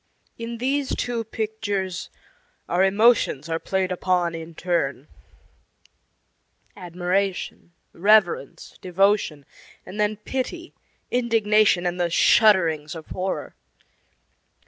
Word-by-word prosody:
In 230 0 -6
these 270 +3 -1
two 240 -2 -2
pictures 205 -4 -4 0.6
our 180 +2 +2
emotions 200 - +3
are 165 0 -2
played 190 0 -1
upon 180 -1 0
in 165 0 -8
turn 155 -6 -2 1.7
admiration, 180 0 -3 0.2
reverence, 195 -6 +1
devotion, 185 -5 +1 0.4
and 210 - -9
then 210 0 +1
pity, 265 - -5 0.4
indignation, 215 -6 +2
and 175 0 -2
the 175 - +1
shudderings 170 -6 +3
of 160 -1 -9
horror. 185 +1 -4
190 Hz, 95 wpm, -23 LUFS, 175-220 Hz, 1.7 s, emotions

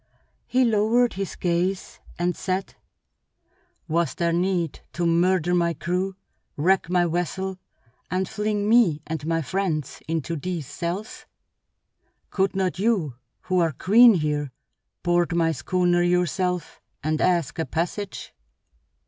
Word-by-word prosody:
He 255 0 +3
lowered 230 +2 +3
his 195 0 -4
gaze 180 +2 -1 0.2
and 175 0 0
said: 185 +1 -3 1.1
"Was 170 +1 0
there 170 -1 0
need 175 -2 0
to 175 - -1
murder 175 +1 +2
my 170 -1 +2
crew, 185 +2 -2 0.4
wreck 180 +4 +2
my 180 -1 +3
vessel, 180 +3 -2 0.5
and 185 +1 -1
fling 210 0 -1
me 210 -10 +4
and 160 -1 -4
my 165 0 0
friends 170 -4 -2
into 165 +1 -2
these 165 0 -4
cells? 175 +9 -5 1.0
Could 190 0 0
not 185 -1 -1
you, 195 - +1 0.3
who 185 0 0
are 165 -3 +2
queen 225 - +6
here, 150 -4 -1 0.5
board 175 0 +2
my 165 -1 +2
schooner 175 +1 +1
yourself 180 0 0 0.2
and 155 +1 0
ask 170 -7 +1
a 160 - 0
passage?" 180 +5 -4
175 Hz, 125 wpm, -24 LUFS, 165-190 Hz, 1.1 s, queen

